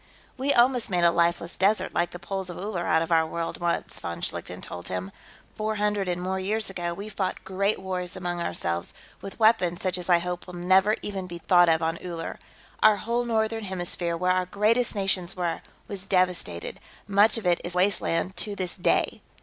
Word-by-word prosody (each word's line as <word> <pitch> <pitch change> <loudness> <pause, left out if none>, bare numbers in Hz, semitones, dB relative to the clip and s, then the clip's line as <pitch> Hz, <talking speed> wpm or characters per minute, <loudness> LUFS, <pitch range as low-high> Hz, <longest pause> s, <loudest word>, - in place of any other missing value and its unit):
"We 270 +2 0
almost 245 -2 +4
made 180 -2 +1
a 170 - +6
lifeless 170 0 +1
desert, 200 +3 +2
like 175 -1 +1
the 175 - -8
poles 190 0 -4
of 175 - -7
Uller, 185 -3 -3
out 160 +1 +3
of 165 - -6
our 160 -1 +4
world, 165 +2 -4
once," 175 0 -1
von 85 0 -5
Schlichten - - -4
told 90 0 -7
him. 95 +1 -4 0.4
"Four 215 0 -2
hundred 210 -2 0
and 180 -1 -1
more 190 +1 -2
years 210 +2 0
ago, 175 -2 -3
we 200 +3 -7
fought 195 -3 -3
great 195 +2 0
wars 185 -1 -4
among 175 -2 -3
ourselves, 85 - -2 0.3
with 195 - -9
weapons 215 -6 +4
such 185 -1 -1
as 180 - -7
I 175 - +7
hope 175 +1 -4
will 180 - -8
never 190 +4 +4
even 195 -3 -4
be 175 -1 -7
thought 175 0 +5
of 160 0 +3
on 165 +1 -1
Uller. 170 -2 -5 0.4
Our 215 -1 +6
whole 235 +3 -1
Northern 225 -1 0
Hemisphere, 175 -2 -2
where 180 +2 +2
our 185 0 +1
greatest 220 +5 +2
nations 195 -2 0
were, 175 -2 -1 0.3
was 195 -1 -7
devastated; 180 - 0 0.3
much 205 +3 +4
of 225 - -5
it 175 -1 +3
is 175 +1 -4
wasteland 185 -1 +1
to 205 -1 -3
this 185 -3 -4
day. 180 - +1
185 Hz, 200 wpm, -26 LUFS, 175-205 Hz, 0.4 s, I